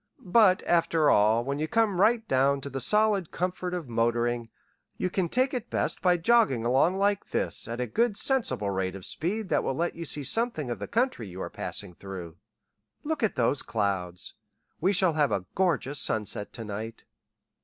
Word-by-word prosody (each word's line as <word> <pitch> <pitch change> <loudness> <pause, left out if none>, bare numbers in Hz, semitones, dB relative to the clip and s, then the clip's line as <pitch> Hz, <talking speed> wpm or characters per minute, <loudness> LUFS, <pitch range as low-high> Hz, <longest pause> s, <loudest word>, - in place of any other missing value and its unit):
But, 210 -6 +5
after 165 -3 +3
all, 110 +3 +4
when 140 +3 -3
you 155 - -1
come 210 -2 +1
right 225 +1 +3
down 135 +2 +2
to 140 - -6
the 135 +1 -3
solid 210 -3 +2
comfort 180 0 -3
of 170 -6 -5
motoring, 120 0 0 0.5
you 185 - -2
can 180 -3 0
take 255 +6 +1
it 245 -2 -4
best - - -1
by 180 -1 +3
jogging 175 - +3
along 135 +10 +3
like 200 0 0
this - - 0
at 115 +1 -5
a 125 - 0
good 210 - 0
sensible 220 - +1
rate 95 -1 -2
of 95 - -7
speed 195 +5 -3
that - - +1
will 135 - -1
let 170 +4 -1
you 170 - -6
see 150 -1 -3
something 160 - 0
of 115 - -4
the 100 - -5
country 230 - -1
you 90 0 -9
are - - -5
passing 90 - -5
through. 90 -3 -9 0.7
Look 315 0 -2
at 220 -7 +1
those 130 +2 +1
clouds. 100 -5 -3 0.5
We 185 +4 +2
shall 185 -3 +2
have 150 -2 +1
a 95 - -1
gorgeous 160 -6 0
sunset 105 -1 -1
to 115 - -7
night." 110 +2 -7
150 Hz, 190 wpm, -27 LUFS, -, 0.7 s, But